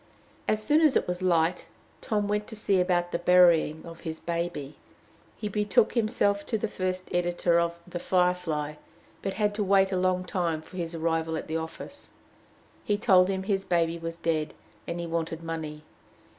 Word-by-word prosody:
As 215 0 +1
soon 300 +8 +4
as 305 -4 +4
it - - +2
was 180 0 -3
light, 175 -1 +1 0.3
Tom 210 -2 0
went 210 0 -1
to - - -8
see 200 -3 +1
about 175 -1 +1
the - - -1
burying 175 -3 +4
of 165 -1 -10
his 160 -2 -6
baby. 170 -4 -3 0.6
He 210 - -3
betook 210 0 +2
himself 215 -3 +2
first - - -17
to 225 - 0
the 185 -4 -3
editor 175 -1 +2
of 170 0 -1
"The 175 0 -5
Firefly," 180 -5 0 0.4
but 195 - -3
had 210 -1 +1
to 210 0 -1
wait 195 0 +4
a 185 - 0
long 185 0 +1
time 170 -4 -1
for 185 - -12
his 170 -1 -3
arrival 165 0 0
at - - -5
the 160 - -2
office. 160 - -8 0.7
He 205 - +1
told 185 -3 +5
him 190 -1 -1
his 195 -1 0
baby 170 -2 +1
was 165 0 -5
dead, 160 -2 -1 0.3
and 170 0 -3
he 170 - -3
wanted 165 0 -3
money. 155 -2 -5
180 Hz, 185 wpm, -27 LUFS, 165-195 Hz, 0.7 s, told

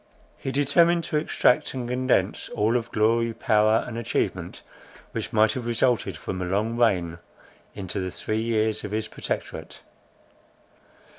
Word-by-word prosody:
He 135 - -4
determined 165 +5 +3
to 155 - -1
extract 150 -4 +2
and 125 -2 -3
condense 125 +1 0
all 110 +3 +2
of 115 -1 -1
glory, 115 +1 +2
power, 110 0 +3
and 115 -1 -5
achievement, 115 - -2 0.5
which - - -4
might 110 0 +4
have 125 -2 -4
resulted 115 -6 +1
from 95 +4 -5
a - - -1
long 105 +5 0
reign, 90 -8 +1 0.6
into 95 0 -4
the 95 -1 -2
three 110 +5 -2
years 110 -1 0
of 105 - -4
his 110 +1 -2
Protectorate. - - -5
110 Hz, 145 wpm, -25 LUFS, 105-125 Hz, 0.6 s, might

